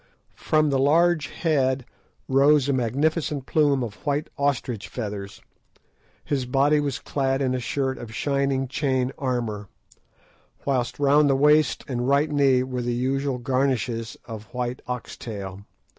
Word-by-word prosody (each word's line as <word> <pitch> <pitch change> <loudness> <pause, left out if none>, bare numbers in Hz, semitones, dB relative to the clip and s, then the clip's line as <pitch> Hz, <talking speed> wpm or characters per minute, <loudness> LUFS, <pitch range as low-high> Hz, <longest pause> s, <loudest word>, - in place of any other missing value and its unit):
From 155 -1 +2
the 135 - +2
large 155 +2 +3
head 135 -6 0 0.4
rose 140 +1 +4
a 140 - +2
magnificent 140 +3 0
plume 145 -4 +2
of 105 -3 -8
white 145 +2 -1
ostrich 130 -6 -1
feathers, 100 -4 -6 0.8
his 135 -4 -1
body 140 +4 +3
was 140 -4 -1
clad 135 +1 -1
in 130 -2 0
a 130 - -1
shirt 130 +1 -2
of 115 -2 -8
shining 140 -1 0
chain 130 -1 0
armour, 115 -6 -2 1.0
whilst 130 -4 0
round 145 +1 +4
the 135 - +4
waist 150 +2 +3
and 125 -2 -2
right 145 +2 +3
knee 135 -3 +3
were 130 -1 -3
the 120 0 -1
usual 135 +2 -1
garnishes 125 -3 -1
of 110 -2 -8
white 125 +2 -4
ox 125 -1 -5
tail. 100 -3 -7
135 Hz, 145 wpm, -24 LUFS, 125-145 Hz, 1.0 s, rose